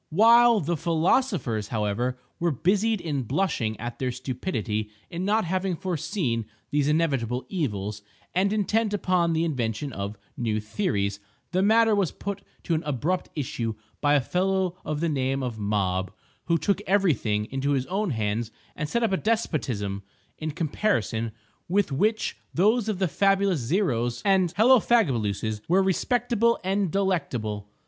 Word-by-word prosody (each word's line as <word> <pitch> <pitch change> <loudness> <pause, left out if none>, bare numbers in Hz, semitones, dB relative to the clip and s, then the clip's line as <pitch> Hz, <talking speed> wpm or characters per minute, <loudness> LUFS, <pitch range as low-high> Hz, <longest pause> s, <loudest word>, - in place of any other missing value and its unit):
While 230 +4 +6
the 170 +2 -1
philosophers, 165 - +1
however, 115 +4 -1 0.2
were 170 - +2
busied 200 - +1
in 150 -6 -2
blushing 125 - -1
at 120 +1 -6
their 130 -1 0
stupidity 120 - -3 0.2
in 175 +1 -3
not 215 +1 +2
having 185 +1 -1
foreseen 160 - -2 0.2
these 145 -1 +2
inevitable 135 -6 0
evils, 105 - -2 0.3
and 190 +3 +2
intent 215 0 +1
upon 180 -4 +1
the 160 +1 +1
invention 130 -2 -2
of 100 +1 -4 0.2
new 110 -3 -1
theories, 105 - -1 0.3
the 185 +1 +2
matter 220 +2 +5
was 200 -5 +1
put 200 0 -5 0.2
to 170 - -1
an 160 - +1
abrupt 150 +6 -1
issue 120 -6 -3 0.3
by 145 0 +4
a 145 - +4
fellow 185 +4 0
of 150 0 -3
the 170 - +1
name 135 -2 0
of 120 -3 -4
Mob, 95 -3 0 0.3
who 170 0 +2
took 200 +3 0
every 195 -3 +4
thing 105 -3 -1
into 135 +2 0
his 130 -2 0
own 195 +4 -1
hands 110 -2 -1 0.3
and 150 - -3
set 235 +6 0
up 225 - +2
a 190 - +2
despotism, 130 - -1 0.4
in 155 - -3
comparison 145 - -1 0.4
with 195 -2 +2
which 215 +11 0 0.2
those 220 +5 +3
of 210 - -1
the 190 0 +1
fabulous 195 0 +2
Zeros 120 - 0
and 190 -4 +3
Hellofagabaluses 135 - +3
were 190 +3 +4
respectable 235 +4 +1
and 195 0 +1
delectable. 120 - -1
160 Hz, 150 wpm, -26 LUFS, 120-195 Hz, 0.4 s, While